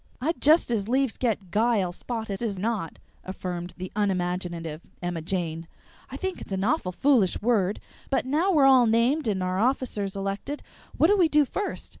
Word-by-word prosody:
"I'd 315 Hz, +7 st, -2 dB
just 310 Hz, -3 st, +5 dB
as 215 Hz, -2 st, -1 dB
'lieves 265 Hz, -1 st, +1 dB
get 205 Hz, -7 st, -2 dB
'guile' 215 Hz, -3 st, +2 dB
spotted 220 Hz, +1 st, -5 dB
as 215 Hz, -5 st, -2 dB
not," 205 Hz, -4 st, -2 dB, 0.3 s
affirmed 180 Hz, -2 st, -5 dB
the 185 Hz, 0 st, -6 dB
unimaginative 180 Hz, -5 st, -2 dB, 0.2 s
Emma 175 Hz, -2 st, -3 dB
Jane. 165 Hz, -2 st, -3 dB, 0.4 s
"I -, -, -6 dB
think 380 Hz, -1 st, -4 dB
it's -, -, -9 dB
an 190 Hz, 0 st, -1 dB
awful 230 Hz, -, 0 dB
foolish 230 Hz, -1 st, +2 dB
word; 210 Hz, -4 st, +1 dB, 0.3 s
but 270 Hz, -, +1 dB
now 315 Hz, +9 st, +2 dB
we're 295 Hz, -6 st, +5 dB
all 260 Hz, -3 st, +6 dB
named 235 Hz, +6 st, +2 dB
and 190 Hz, -3 st, 0 dB
our 185 Hz, +1 st, -1 dB
officers 220 Hz, -5 st, 0 dB
elected, 200 Hz, +9 st, -4 dB, 0.3 s
what -, -, +5 dB
do 410 Hz, +5 st, +5 dB
we 340 Hz, -3 st, +5 dB
do 300 Hz, -1 st, +4 dB
first? 400 Hz, +9 st, -4 dB
210 Hz, 175 wpm, -26 LUFS, 185-265 Hz, 0.4 s, all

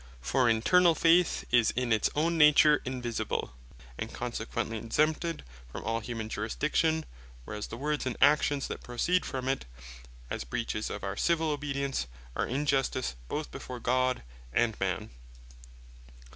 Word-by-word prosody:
For 125 Hz, -, +1 dB
internall 165 Hz, +10 st, +4 dB
faith 170 Hz, +1 st, +4 dB
is 120 Hz, -2 st, +5 dB
in 125 Hz, -1 st, +1 dB
its 110 Hz, -, +2 dB
own 165 Hz, +3 st, +1 dB
nature 150 Hz, -1 st, +6 dB
invisible, 120 Hz, -, -3 dB, 0.5 s
and -, -, -4 dB
consequently 110 Hz, -, -3 dB
exempted 155 Hz, +8 st, 0 dB, 0.3 s
from -, -, -6 dB
all 115 Hz, +1 st, -1 dB
humane 115 Hz, -1 st, -5 dB
jurisdiction; 150 Hz, +9 st, 0 dB, 0.4 s
whereas 105 Hz, +5 st, -5 dB
the 115 Hz, -, -7 dB
words, 150 Hz, +1 st, -1 dB
and 125 Hz, -, -3 dB
actions 145 Hz, -2 st, +3 dB
that -, -, -6 dB
proceed 170 Hz, +10 st, 0 dB
from 130 Hz, -1 st, -4 dB
it, 135 Hz, -, -1 dB, 0.6 s
as -, -, -4 dB
breaches 105 Hz, -, -3 dB
of -, -, -6 dB
our 95 Hz, 0 st, -3 dB
Civil 165 Hz, +4 st, +1 dB
obedience, 140 Hz, -, -2 dB, 0.3 s
are -, -, 0 dB
injustice 135 Hz, -, 0 dB
both -, -, -4 dB
before 125 Hz, -, -7 dB
God 130 Hz, -, +1 dB, 0.3 s
and 115 Hz, -, +2 dB
Man. 95 Hz, -8 st, -2 dB
130 Hz, 140 wpm, -30 LUFS, 115-150 Hz, 0.6 s, nature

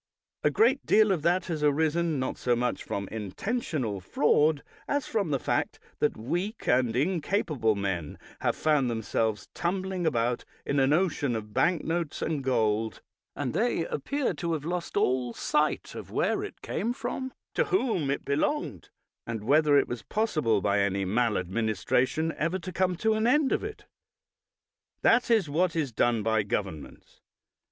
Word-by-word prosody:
A -, -, +4 dB
great 440 Hz, -, +3 dB
deal 215 Hz, -1 st, +4 dB
of 175 Hz, -5 st, +1 dB
that 175 Hz, +3 st, +2 dB
has 160 Hz, -4 st, -3 dB
arisen, 160 Hz, +2 st, +2 dB
not 130 Hz, 0 st, -2 dB
so 120 Hz, -1 st, +1 dB
much 120 Hz, +1 st, -1 dB
from 100 Hz, -1 st, -4 dB
intentional 115 Hz, -, -3 dB
fraud 150 Hz, -, +2 dB, 0.2 s
as 285 Hz, -1 st, 0 dB
from 205 Hz, -7 st, -1 dB
the 140 Hz, -, +1 dB
fact -, -, -1 dB, 0.2 s
that -, -, +1 dB
weak 175 Hz, -, -3 dB
and 125 Hz, -2 st, +3 dB
incapable 150 Hz, -, +1 dB
men 95 Hz, -6 st, -3 dB, 0.2 s
have -, -, 0 dB
found 150 Hz, -5 st, +2 dB
themselves 110 Hz, -2 st, -1 dB
tumbling 185 Hz, 0 st, -1 dB
about 120 Hz, -4 st, 0 dB, 0.2 s
in 140 Hz, -, +1 dB
an 135 Hz, +1 st, +3 dB
ocean 150 Hz, -7 st, +1 dB
of 105 Hz, -1 st, -6 dB
bank 170 Hz, +5 st, +2 dB
notes 165 Hz, -2 st, -2 dB
and 150 Hz, -4 st, -1 dB
gold, 110 Hz, -4 st, 0 dB, 0.3 s
and 130 Hz, -4 st, -3 dB
they 225 Hz, -8 st, +1 dB
appear 280 Hz, -, -1 dB
to 170 Hz, -2 st, -2 dB
have 150 Hz, -2 st, -3 dB
lost 175 Hz, +1 st, -3 dB
all 125 Hz, -1 st, +1 dB
sight -, -, 0 dB
of -, -, -8 dB
where -, -, 0 dB
it -, -, -9 dB
came 230 Hz, +4 st, -1 dB
from, 260 Hz, +2 st, -4 dB, 0.2 s
to -, -, +2 dB
whom 255 Hz, -, 0 dB
it 140 Hz, -, -2 dB
belonged, 155 Hz, -, -1 dB, 0.4 s
and 115 Hz, -2 st, -4 dB
whether 145 Hz, +4 st, +4 dB
it -, -, +3 dB
was 120 Hz, -2 st, -5 dB
possible 155 Hz, -, 0 dB
by 100 Hz, +1 st, +2 dB
any 100 Hz, -1 st, +1 dB
maladministration 115 Hz, -, 0 dB
ever 165 Hz, +4 st, 0 dB
to 185 Hz, 0 st, -7 dB
come 185 Hz, 0 st, +1 dB
to 220 Hz, +6 st, +1 dB
an 220 Hz, +1 st, +1 dB
end 290 Hz, +2 st, +3 dB
of -, -, +1 dB
it. 425 Hz, +1 st, -7 dB, 1.2 s
That 245 Hz, +2 st, +4 dB
is 220 Hz, -7 st, +3 dB
what 170 Hz, +4 st, +1 dB
is 150 Hz, -6 st, 0 dB
done 115 Hz, -1 st, +1 dB
by 110 Hz, 0 st, +2 dB
governments. 95 Hz, -7 st, -5 dB
145 Hz, 160 wpm, -28 LUFS, 115-185 Hz, 1.2 s, A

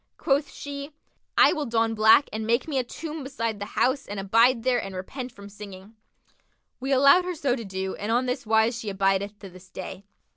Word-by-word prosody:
Quoth 280 Hz, +1 st, +1 dB
she, 285 Hz, +1 st, -8 dB, 0.4 s
'I -, -, +6 dB
will 300 Hz, -5 st, -3 dB
don 225 Hz, -1 st, +1 dB
black 220 Hz, +6 st, +5 dB
and 220 Hz, 0 st, -3 dB
make 235 Hz, +7 st, +1 dB
me 280 Hz, -4 st, 0 dB
a -, -, 0 dB
tomb 310 Hz, +4 st, -7 dB
beside 230 Hz, -5 st, -3 dB
the 205 Hz, -, -5 dB
house 265 Hz, +2 st, +1 dB
and 205 Hz, 0 st, -5 dB
abide 230 Hz, +5 st, +3 dB
there 250 Hz, -2 st, +2 dB
and 195 Hz, -1 st, -7 dB
repent 250 Hz, +7 st, -6 dB
from 200 Hz, -3 st, -12 dB
singing.'[FN#51] 200 Hz, 0 st, -11 dB, 0.9 s
We 265 Hz, +2 st, -3 dB
allowed 280 Hz, +6 st, +6 dB
her 360 Hz, 0 st, -4 dB
so 275 Hz, -5 st, 0 dB
to 235 Hz, -, -6 dB
do 190 Hz, -1 st, -4 dB
and 210 Hz, +2 st, -3 dB
on 245 Hz, +2 st, +2 dB
this 250 Hz, 0 st, -2 dB
wise 220 Hz, +2 st, +2 dB
she 220 Hz, -, -5 dB
abideth 195 Hz, +1 st, 0 dB
to 200 Hz, -2 st, -11 dB
this 185 Hz, +1 st, -15 dB
day. 190 Hz, +1 st, -8 dB
230 Hz, 210 wpm, -25 LUFS, 200-270 Hz, 0.9 s, I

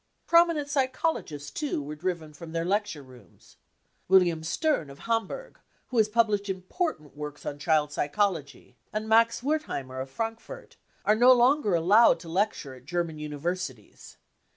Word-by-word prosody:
Prominent 335 Hz, -3 st, +4 dB
psychologists, 260 Hz, -, -1 dB
too, 295 Hz, -, -2 dB
were 145 Hz, +1 st, -6 dB
driven 160 Hz, -2 st, -4 dB
from 160 Hz, +2 st, -10 dB
their 165 Hz, 0 st, -1 dB
lecture 200 Hz, -5 st, -1 dB
rooms. 130 Hz, -2 st, -18 dB, 0.5 s
William 175 Hz, -4 st, +4 dB
Stern, 170 Hz, -, 0 dB
of 140 Hz, -, -11 dB
Hamburg, 230 Hz, -, -3 dB, 0.3 s
who 250 Hz, -, -3 dB
has 215 Hz, -1 st, +4 dB
pub 230 Hz, +1 st, +3 dB
hshed 205 Hz, -1 st, -2 dB
important 185 Hz, -, -3 dB
works 150 Hz, 0 st, -7 dB
on 145 Hz, -, -5 dB
child 150 Hz, -1 st, +2 dB
psychology, 155 Hz, -1 st, -2 dB
and 215 Hz, +1 st, -3 dB
Max 230 Hz, +2 st, +3 dB
Wertheimer, 255 Hz, -, -2 dB
of 135 Hz, -, -6 dB
Frankfurt, 225 Hz, -, -6 dB, 0.3 s
are 210 Hz, -, +5 dB
no 245 Hz, +4 st, +6 dB
longer 250 Hz, -4 st, +4 dB
allowed 190 Hz, +5 st, +5 dB
to 170 Hz, -, -10 dB
lecture 180 Hz, -6 st, -1 dB
at 130 Hz, -1 st, -15 dB
German 170 Hz, 0 st, -2 dB
Universities. 150 Hz, -, -5 dB
185 Hz, 150 wpm, -27 LUFS, 150-230 Hz, 0.5 s, no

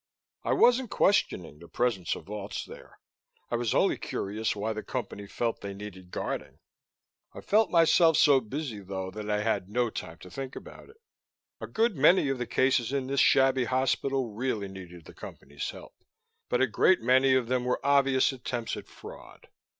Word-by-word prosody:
I -, -, +1 dB
wasn't 245 Hz, 0 st, +4 dB
questioning 90 Hz, -, +1 dB
the 85 Hz, -, -13 dB
presence 105 Hz, -8 st, -1 dB
of -, -, -9 dB
vaults 105 Hz, 0 st, -6 dB
there; -, -, -13 dB, 0.5 s
I -, -, +1 dB
was 120 Hz, -2 st, -1 dB
only -, -, +2 dB
curious 105 Hz, +3 st, -3 dB
why 110 Hz, +2 st, -2 dB
the 110 Hz, -, -5 dB
Company 105 Hz, -5 st, -6 dB
felt 115 Hz, +2 st, -3 dB
they 100 Hz, -1 st, -6 dB
needed 95 Hz, -3 st, -10 dB
guarding. -, -, -5 dB, 0.8 s
I -, -, -8 dB
found 215 Hz, 0 st, +2 dB
myself 165 Hz, -1 st, +5 dB
so 140 Hz, -3 st, +6 dB
busy, 125 Hz, -1 st, -5 dB
though, 95 Hz, -1 st, -5 dB
that 105 Hz, +1 st, -7 dB
I 105 Hz, 0 st, 0 dB
had 100 Hz, -4 st, -1 dB
no 120 Hz, +1 st, 0 dB
time 85 Hz, -4 st, -7 dB
to 90 Hz, -, -12 dB
think 135 Hz, +4 st, -6 dB
about -, -, -11 dB
it. 440 Hz, -, -18 dB, 0.6 s
A -, -, -6 dB
good 225 Hz, -2 st, +1 dB
many 150 Hz, +2 st, +4 dB
of 135 Hz, -2 st, -2 dB
the 125 Hz, -, -3 dB
cases 130 Hz, -2 st, +1 dB
in 140 Hz, -2 st, -1 dB
this 135 Hz, +1 st, -1 dB
shabby 135 Hz, -1 st, +4 dB
hospital 130 Hz, -1 st, 0 dB
really 110 Hz, -3 st, -2 dB
needed 90 Hz, -3 st, -11 dB
the -, -, -13 dB
Company's 70 Hz, +1 st, -8 dB
help. -, -, -11 dB, 0.6 s
But 125 Hz, -, +1 dB
a -, -, +5 dB
great 130 Hz, -, +3 dB
many 130 Hz, +2 st, +4 dB
of 125 Hz, -3 st, +1 dB
them 125 Hz, 0 st, 0 dB
were 125 Hz, 0 st, 0 dB
obvious 135 Hz, -2 st, +3 dB
attempts 120 Hz, -3 st, -4 dB
at -, -, -9 dB
fraud. -, -, -13 dB
120 Hz, 180 wpm, -28 LUFS, 100-135 Hz, 0.8 s, so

